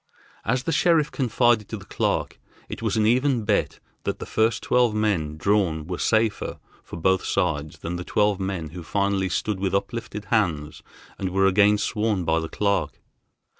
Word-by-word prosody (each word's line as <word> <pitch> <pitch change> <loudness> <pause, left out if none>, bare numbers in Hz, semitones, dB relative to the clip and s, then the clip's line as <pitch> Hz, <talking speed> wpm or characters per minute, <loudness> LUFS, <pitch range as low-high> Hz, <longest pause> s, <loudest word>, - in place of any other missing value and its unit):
As 125 0 0
the 165 - -1
sheriff 160 -1 +3
confided 120 -4 +2
to - - -4
the - - -12
clerk, - - -1 0.3
it - - -7
was 110 -2 0
an 110 - +3
even 125 0 +2
bet 105 -1 0 0.2
that - - -2
the - - -7
first 110 +1 +1
twelve 120 -3 +2
men 90 -9 0
drawn 85 -4 +1
were 90 +1 -5
safer 110 -1 +1 0.3
for - - -9
both 95 +3 +2
sides 75 -6 -1
than 85 +1 -4
the 90 - -5
twelve 105 +1 +1
men 95 -5 -3
who 90 +3 -8
finally 100 +2 0
stood 105 0 -1
with 95 0 0
uplifted 105 +1 -3
hands 80 -9 0 0.4
and 95 - -1
were 95 +1 +2
again 100 +2 +5
sworn 105 -3 -1
by 80 0 +2
the 80 -1 -5
clerk. 100 -1 -1
100 Hz, 175 wpm, -24 LUFS, 90-110 Hz, 0.4 s, again